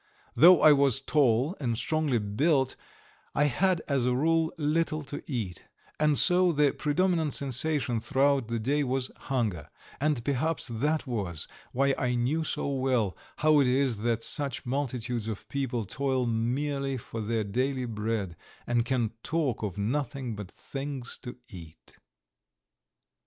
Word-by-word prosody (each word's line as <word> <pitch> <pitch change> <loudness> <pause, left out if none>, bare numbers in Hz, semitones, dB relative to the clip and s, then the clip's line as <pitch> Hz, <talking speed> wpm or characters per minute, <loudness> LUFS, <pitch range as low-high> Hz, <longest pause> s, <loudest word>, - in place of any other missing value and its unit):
Though 175 +1 +7
I 155 - +9
was 140 -3 +3
tall 135 - +2
and 120 -5 -1
strongly 155 -2 0
built, 130 +7 +1 0.6
I 145 - +3
had 175 +5 +1
as 140 -4 +1
a 125 0 +1
rule 160 +3 +2
little 155 0 0
to 145 +1 -6
eat, 105 -9 -4 0.3
and 150 -2 +3
so 180 -1 +5
the 150 -3 +3
predominant 160 0 0
sensation 135 -2 +1
throughout 135 +2 +1
the 115 0 -2
day 140 +6 0
was 130 -1 -1
hunger, 110 - -2 0.3
and 140 -5 0
perhaps 145 +4 0
that 150 +8 0
was 100 - -2 0.2
why 135 +2 +2
I 125 -1 0
knew 135 +7 0
so 155 - -2
well 130 -7 0 0.2
how 155 -1 +4
it 135 - +4
is 130 -2 +1
that 115 +1 -1
such 140 -1 -1
multitudes 125 -3 -2
of 110 -3 -6
people 130 -5 -2
toil 130 +5 -1
merely 135 +4 -1
for 115 -1 -6
their 110 +1 -1
daily 130 +5 -1
bread, 105 -5 -3 0.3
and 120 -1 +1
can 120 -2 0
talk 150 -7 -1
of 105 -4 -4
nothing 125 +2 -2
but 105 -3 -7
things 135 0 -6
to 125 - -8
eat. 85 -7 -12
130 Hz, 145 wpm, -28 LUFS, 115-145 Hz, 0.6 s, I